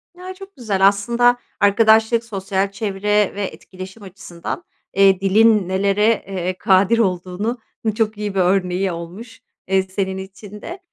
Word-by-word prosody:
Ya, 365 +1 -8
çok 390 +1 -13
güzel 200 -6 +2
aslında 235 +5 +2 0.2
arkadaşlık, 220 +2 +4
sosyal 195 -2 -2
çevre 205 0 0
ve 205 - -3
etkileşim 190 +3 -10
açısından, 185 - -7 0.3
eee, 195 -1 +4
dilin 210 0 +4
nelere, 200 +2 +1 0.2
eee, 185 -1 -3
kadir 195 +5 +3
olduğunun 190 +4 -1 0.4
çok 215 -1 -1
iyi 210 -2 -4
bir - - +1
örneği 185 0 +1
olmuş, 195 +8 -9 0.3
eee, 190 0 +2
senin 190 0 -3
için 195 +2 -10
de. 350 +3 -8
200 Hz, 135 wpm, -20 LUFS, 190-220 Hz, 0.4 s, arkadaşlık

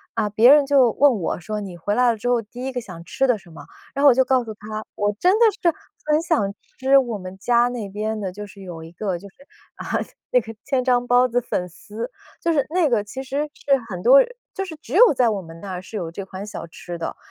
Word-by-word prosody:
啊， - - +1
别 230 +5 +6
人 290 -1 +6
就 270 -4 +5
问 275 -6 +4
我 175 - -2
说： 210 +4 -4
“你 190 -4 -7
回 205 +5 -2
来 245 +2 +4
了 225 - -3
之 235 - -4
后 245 -1 +2
第 245 +4 -9
一 265 - -2
个 250 -1 -3
想 170 -5 -10
吃 270 +10 0
的 245 -4 +3
什 175 -3 -17
么？ - - -12 0.3
“然 275 - -2
后 290 - +8
我 - - +7
就 260 - +4
告 255 -1 +2
诉 225 - -7
他， 215 +1 -6
我 205 0 0
真 365 - +4
的 - - +6 0.2
是 340 -2 +3 0.3
很 305 +1 +2
想 205 - 0 0.3
吃 265 +1 +5
我 240 -5 +1
们 185 0 -9
家 240 +4 +3
那 235 -5 -5
边 215 +2 -3
的 190 -2 -3
就 205 +2 -8
是 200 0 -14
有 175 -4 -8
一 165 - -11
个 190 -1 -2
就 200 - -11
是， - - -31 0.4
啊， - - -8 0.5
那 250 - +5
个 225 0 -10
千 270 -2 0
张 245 -1 +2
包 245 +1 +5
子 245 0 0
粉 180 -6 -2
丝。 210 +7 -7 0.3
就 335 - +1
是 280 -4 +2
那 340 -1 +2
个 225 -5 +2
其 260 +6 -7
实 280 +3 -2
是 275 -1 +1
很 180 -3 -5
多 270 +3 +8 0.3
就 390 - -3
是 330 - -8
只 245 - -10
有 455 +3 +7
在 250 -2 +3
我 205 -3 -2
们 165 -1 -12
那 185 -2 -6
是 215 +3 -8
有 170 -4 -4
这 195 +3 -6
款 190 +1 -7
小 200 -5 -7
吃 175 +1 -8
的， 165 - -4
225 Hz, 280 characters per minute, -22 LUFS, 195-265 Hz, 0.5 s, 后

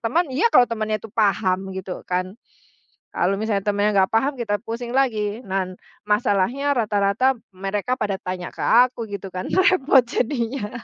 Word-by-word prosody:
teman, 285 +10 +1
iya 320 - +3
kalau 250 - +6
temannya 215 -2 -2
itu 215 0 -12
paham 195 -3 +1
gitu 190 -1 -6
kan, 185 +1 -1 0.8
kalau 185 +3 0
misalnya 205 -1 -2
temennya 205 0 +2
nggak 190 -1 +3
paham 270 +4 +1
kita 205 -4 -2
pusing 235 +2 -5
lagi. 220 -4 0
Nah, 190 -3 -3 0.3
masalahnya 210 +5 +1
rata-rata 210 +4 +2 0.2
mereka 200 +6 -3
pada 205 -4 -1
tanya 180 -1 -5
ke - - -6
aku, 240 -2 +3
gitu 200 -1 -6
kan 185 - -4
repot 320 -9 +4
jadinya. 235 -2 -2
215 Hz, 155 wpm, -22 LUFS, 195-245 Hz, 0.8 s, kalau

